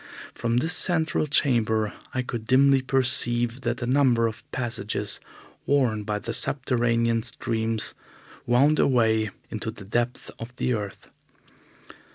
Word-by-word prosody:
From 115 0 -1
this 160 +7 +1
central 160 -3 +1
chamber 110 -7 +2 0.2
I 130 - -1
could 115 -3 -6
dimly 135 +1 +5
perceive 125 -2 0
that 120 0 -2
a - - 0
number 125 -3 +3
of 110 -1 -3
passages 105 -4 -3 0.5
worn 125 -7 +2
by 105 0 -1
the 115 +3 -5
subterranean 115 -4 +1
streams 110 -1 0 0.5
wound 135 +6 +4
away 110 -4 +3 0.2
into 110 +1 -3
the 105 -3 -9
depths 120 +4 -2
of 115 +2 -8
the 125 - 0
earth. 105 -4 -6
120 Hz, 130 wpm, -25 LUFS, 110-130 Hz, 0.5 s, dimly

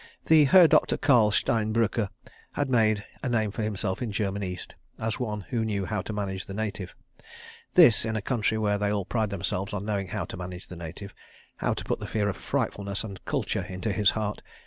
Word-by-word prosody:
The 155 -2 +6
Herr 175 +5 +8
Doktor - - +3
Karl 125 -7 +5
Stein 110 +1 +1
Brücker 115 -2 +1 0.4
had 145 -2 -1
made 110 -3 +3 0.2
a - - -2
name 110 -3 +1
for 110 - -4
himself 105 -2 -2
in 120 -3 -2
German 100 -1 -1
East, 90 -2 -5 0.2
as 110 0 -3
one 105 -4 -2
who 115 -2 0
knew 100 -3 -1
how 105 +1 -2
to 110 - -6
manage 100 -2 -3
the 95 - -6
native. 100 -4 -4 0.8
This 110 - +7
in 110 0 -2
a 110 - -1
country 110 -2 0
where 105 -1 +1
they 105 0 +1
all 100 -2 -1
pride 110 -1 0
themselves 95 0 -2
on 100 0 -3
knowing 100 -3 -1
how 95 0 -3
to - - -8
manage 90 0 -7
the 90 - -8
native—how 85 +4 -6
to - - -5
put - - -2
the - - -6
fear 105 -2 0
of 95 - -3
Frightfulness 100 0 -2
and 100 -4 -8
Kultur - - -1
into 95 +3 -3
his 100 +1 +4
heart. 105 -1 -2
105 Hz, 210 wpm, -27 LUFS, 100-110 Hz, 0.8 s, Herr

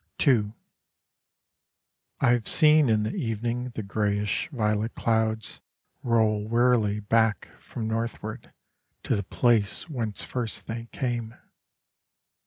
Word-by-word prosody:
II 110 -6 +3 1.7
I 120 - +5
have 120 -2 +1
seen 155 -3 +5
in 110 -1 +3
the 105 - -2
evening 120 - -2
The 110 - -3
greyish 105 0 -1
violet 110 -4 -1
clouds 110 -1 0 0.4
Roll 110 -3 +1
wearily 115 -3 +2
back 110 0 +1
from 110 -2 -6
northward 115 0 -4 0.5
To - - +1
the 100 - -1
place 110 - +1
whence 115 - -3
first 120 -4 -3
they 115 +1 -6
came. 120 -3 -3
115 Hz, 110 wpm, -26 LUFS, 105-120 Hz, 1.7 s, I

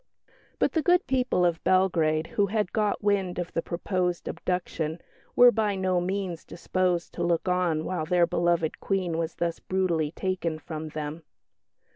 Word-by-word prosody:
But - - +2
the 320 - +1
good 355 +3 +3
people 250 -9 +1
of 170 -2 0
Belgrade, 165 -4 +2
who 200 +4 0
had 210 -1 -1
got 210 -1 0
wind 195 -3 +1
of 175 -1 -4
the 165 - 0
proposed 180 0 -2
abduction, 170 -3 -3 0.4
were 245 0 +8
by 215 -3 0
no 185 -2 +1
means 185 -2 -3
disposed 180 0 -1
to 175 - -3
look 170 +1 0
on 180 -4 +1
while 175 -4 -2
their 175 +1 +3
beloved 170 -2 0
Queen 185 -4 -1
was 165 0 -3
thus 170 -1 -2
brutally 175 -5 0
taken 170 -1 -2
from 155 0 -6
them. 155 +1 -5
180 Hz, 160 wpm, -27 LUFS, 165-190 Hz, 0.4 s, were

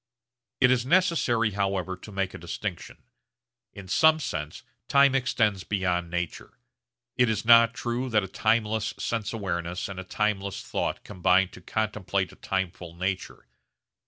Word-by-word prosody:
It 125 - +5
is 125 -2 +2
necessary 130 - +2
however 95 -2 -1
to 95 +4 -12
make 95 -1 -2
a - - -8
distinction. 85 +2 -6 0.7
In 100 -2 -11
some 160 +10 +4
sense 75 - -5 0.2
time 140 -1 +5
extends 110 -7 +1
beyond 90 -4 -1
nature. 85 -1 -5 0.6
It 125 -2 +4
is 110 0 -1
not 115 0 +7
true 120 +2 -2
that 105 -3 +2
a - - -4
timeless 110 +2 0
sense 110 -2 -2
awareness 90 -5 -3
and 100 -2 -7
a - - -5
timeless 100 0 -2
thought - - -3
combine 95 -1 +2
to 90 - -13
contemplate 100 -2 -2
a - - -15
timeful 90 -3 -4
nature. 95 +1 -3
100 Hz, 145 wpm, -27 LUFS, 95-115 Hz, 0.7 s, not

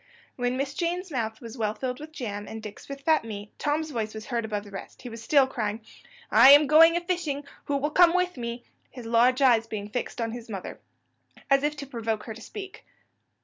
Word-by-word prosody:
When 245 0 -1
Miss 275 +1 -2
Jane's 350 +2 -2
mouth 225 -3 -3
was 230 +1 -9
well 215 -1 0
filled 250 +2 -4
with 305 +1 -9
jam, 210 -8 -5
and 220 - -7
Dick's 210 +4 -10
with 275 0 -7
fat 315 -3 +3
meat, 210 -2 -7
Tom's 305 +1 -1
voice 220 -4 -3
was 215 0 -7
heard 235 -3 -2
above 210 -2 -3
the 205 - -13
rest; 195 - -9
he 245 - -6
was 230 -1 -9
still 275 +4 +4
crying, 220 -4 -3 0.5
"I 235 +5 +8
am 295 +1 +7
going 325 +3 +7
a - - -1
fishing; 340 -5 -2 0.2
who 285 - 0
will 295 +2 -1
come 350 +1 +5
with 360 0 +1
me?" 235 -1 -5 0.3
his 245 -3 -10
large 245 +4 +3
eyes 230 -3 +4
being 210 -2 -5
fixed 245 +2 -4
on 230 -1 -1
his 235 0 -8
mother, 195 -4 -6 0.7
as 275 0 +5
if 295 +1 0
to 280 - -6
provoke 225 -4 -3
her 225 - -6
to 225 - -12
speak. 390 - -9
245 Hz, 225 wpm, -26 LUFS, 225-295 Hz, 0.7 s, I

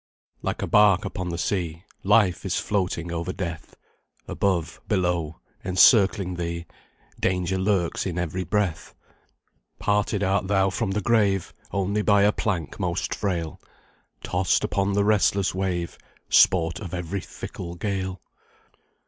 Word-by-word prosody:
"Like - - -3
a - - -2
bark 105 -3 +5
upon 90 -1 -4
the 85 - -3
sea, 85 -2 -2 0.2
Life 100 -3 +3
is - - -1
floating 90 -4 -1
over 85 +1 -3
death; 85 -4 -6 0.5
Above, 90 -4 -1
below, 90 -5 -1 0.2
encircling 95 0 +4
thee, 85 0 -4 0.5
Danger 95 0 0
lurks 95 -2 0
in 90 -2 -4
every 90 +1 -2
breath. 100 -5 -2 0.8
Parted 105 0 0
art 95 0 +1
thou 95 -1 +2
from 95 - -2
the 100 +2 -1
grave 100 -4 +1 0.2
Only 100 +2 0
by 100 -1 +4
a 105 - +5
plank 90 -9 -3
most - - -1
frail; 85 -6 -3 0.6
Tossed 90 +1 +1
upon 100 0 0
the 100 0 +2
restless 100 -2 +2
wave, 90 -2 -3 0.3
Sport 85 -2 +4
of 90 -4 -6
every 90 +2 -3
fickle 85 +1 -8
gale. 95 -1 -3
95 Hz, 130 wpm, -25 LUFS, 85-100 Hz, 0.8 s, bark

